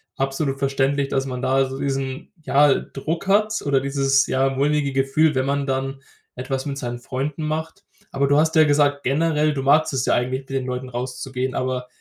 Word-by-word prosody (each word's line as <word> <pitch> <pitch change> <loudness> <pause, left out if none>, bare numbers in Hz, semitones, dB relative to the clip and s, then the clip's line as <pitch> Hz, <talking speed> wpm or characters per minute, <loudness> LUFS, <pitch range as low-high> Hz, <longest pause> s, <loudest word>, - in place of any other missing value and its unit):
Absolut 135 +1 -1
verständlich, 135 0 0
dass 135 -1 0
man 125 -1 -4
da 135 +1 +2
so 135 +1 -6
diesen, 135 -1 -3
ja, 145 -1 +4
Druck 165 +7 -4
hat, 215 +2 +2
oder 135 -2 +2
dieses 135 0 +2
ja 135 +1 +1
mulmige 140 +1 0
Gefühl, 135 +3 +2
wenn 130 0 +1
man 140 0 -1
dann 135 0 -2 0.3
etwas 130 +2 -3
mit 140 -1 -4
seinen 120 -1 -4
Freunden 140 +5 -4
macht. 160 +5 -4 0.3
Aber 140 0 +1
du 145 +1 +3
hast 160 +1 +2
ja 155 - +7
gesagt, 145 -1 +2
generell 150 +2 +1
du 135 - -3
magst 150 +2 +3
es 130 -1 0
ja - - +2
eigentlich, 130 +2 -1
mit 135 - -24
den 135 -1 -2
Leuten 125 0 -4
rauszugehen. 125 +1 -4
Aber 130 -1 -2
135 Hz, 195 wpm, -22 LUFS, 130-145 Hz, 0.3 s, ja